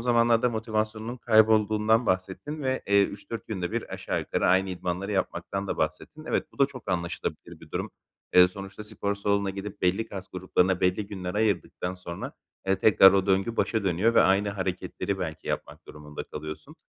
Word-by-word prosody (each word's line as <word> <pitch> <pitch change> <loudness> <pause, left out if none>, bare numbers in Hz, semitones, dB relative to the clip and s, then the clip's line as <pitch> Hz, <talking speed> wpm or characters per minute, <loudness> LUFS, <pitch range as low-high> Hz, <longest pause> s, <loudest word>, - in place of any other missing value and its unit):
zamanlarda 120 0 +3
motivasyonunun 110 +1 -2
kaybolduğundan 110 0 +4
bahsettin 95 +12 -2
ve, 130 0 -1
eee, 100 0 +5
3-4 100 +2 -5
günde 95 -2 -3
bir 115 - -3
aşağı - - -2
yukarı - - -1
aynı 95 +1 +3
idmanları 90 +3 -3
yapmaktan 100 0 -2
da - - -2
bahsettin. 80 - -3
Evet, - - -1
bu - - -21
da 140 - +5
çok 125 -8 -8
anlaşılabilir 85 -1 -4
bir - - -15
durum. - - -3 0.4
Eee, 90 0 +8
sonuçta 100 +2 -9
spor 100 -1 -2
salonuna 100 -1 0
gidip 100 0 -7
belli 95 +5 +1
kas 95 -2 -7
gruplarına 90 0 +1
belli 90 +3 +1
günler 90 -2 -5
ayırdıktan 100 -3 -1
sonra, 85 -2 -7 0.3
eee, 95 0 +3
tekrar 95 -2 +7
o 100 0 +2
döngü 95 +4 +1
başa 110 -3 0
dönüyor 95 +6 +2
ve - - +7
aynı 100 +2 +3
hareketleri 95 0 -3
belki 80 -4 -5
yapmak - - -4
durumunda 75 0 -8
kalıyorsun. 75 0 -8
100 Hz, 170 wpm, -27 LUFS, 90-110 Hz, 0.4 s, Eee